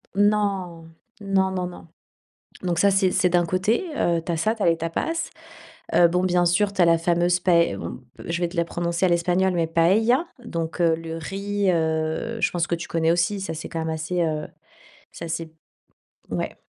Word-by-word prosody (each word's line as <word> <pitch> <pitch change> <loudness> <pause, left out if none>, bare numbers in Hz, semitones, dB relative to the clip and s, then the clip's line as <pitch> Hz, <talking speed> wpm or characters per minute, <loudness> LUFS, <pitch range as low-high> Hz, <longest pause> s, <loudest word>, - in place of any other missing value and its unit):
Non. 200 -5 0 0.3
Non, 195 -1 +1
non, 185 -1 -2
non. 175 -1 -10 0.8
Donc 175 -2 -1
ça, 200 +2 +5
c'est 195 -1 +3
c'est 180 - +2
d'un 175 0 +2
côté, 185 - 0
heu, 170 -1 +1
tu 175 - -2
as 165 - 0
ça, 215 +7 +1
tu 220 - -5
as - - +2
les 165 -1 +4
tapas. 320 - -2 0.7
Heu, 175 - +7
bon, 180 +2 0
bien 180 -1 +2
sûr, 190 +4 +2
tu 190 - +1
as - - +7
la 165 0 +5
fameuse 175 +1 +2
pae 170 - +3
bon, 85 +7 -6 0.3
je 170 +1 -2
vais 175 - +2
te 180 - -11
la 170 0 +1
prononcer 170 +2 -1
à - - +3
l'espagnol, 180 +2 +2
mais, 170 -2 +1
paella. 220 - +3 0.2
Donc, 165 -5 -4
heu, 165 -1 +4
le 165 0 -6
riz, 200 +3 -1
heu, 160 +7 -1
je - - +1
pense 175 -1 -1
que 170 - 0
tu 170 - -7
connais 165 0 +1
aussi, 175 +4 +1
ça, 175 -4 -4
c'est 160 - -6
quand 165 - -4
même 160 0 -2
assez, 160 +3 -2
heu, 155 -2 -1 0.6
c'est 170 - -8
assez 165 0 -4 0.8
ouais. - - -4
175 Hz, 205 wpm, -24 LUFS, 165-190 Hz, 0.8 s, Heu